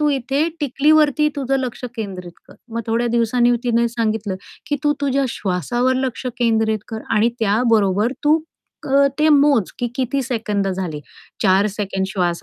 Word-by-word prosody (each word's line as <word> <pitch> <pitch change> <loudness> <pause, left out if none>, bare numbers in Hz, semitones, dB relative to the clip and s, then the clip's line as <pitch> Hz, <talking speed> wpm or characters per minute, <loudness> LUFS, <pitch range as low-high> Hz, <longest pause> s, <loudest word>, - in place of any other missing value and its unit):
तू 300 - +3
इथे 275 +4 0
टिकलीवरती 300 +2 +3
तुझं 270 -1 0
लक्ष 255 -1 -5
केंद्रित 185 -5 -6 0.2
कर." - - -15 0.2
मग 230 - -1
थोड्या 235 +1 0
दिवसांनी 240 +1 +3
तिने 235 0 +2
सांगितलं, 220 -4 -2 0.3
की 290 - 0
"तू 295 - +4
तुझ्या 275 -1 +1
श्वासावर 240 +7 -1
लक्ष 255 0 -4
केंद्रित 220 -2 +2
कर 220 -1 -5
आणि 225 +1 +3
त्याबरोबर 215 0 +2
तू 310 +2 +4 0.5
अ, 280 +1 +5
ते 310 +1 +4
मोज, 285 -8 +4
की 245 - -1
किती 265 +1 -1
सेकंद 220 -5 -2
झाली. 180 -5 -3 0.4
4 195 +1 +4
सेकंड 195 -1 -3
श्वास 180 -3 -1
235 Hz, 155 wpm, -20 LUFS, 205-270 Hz, 0.5 s, अ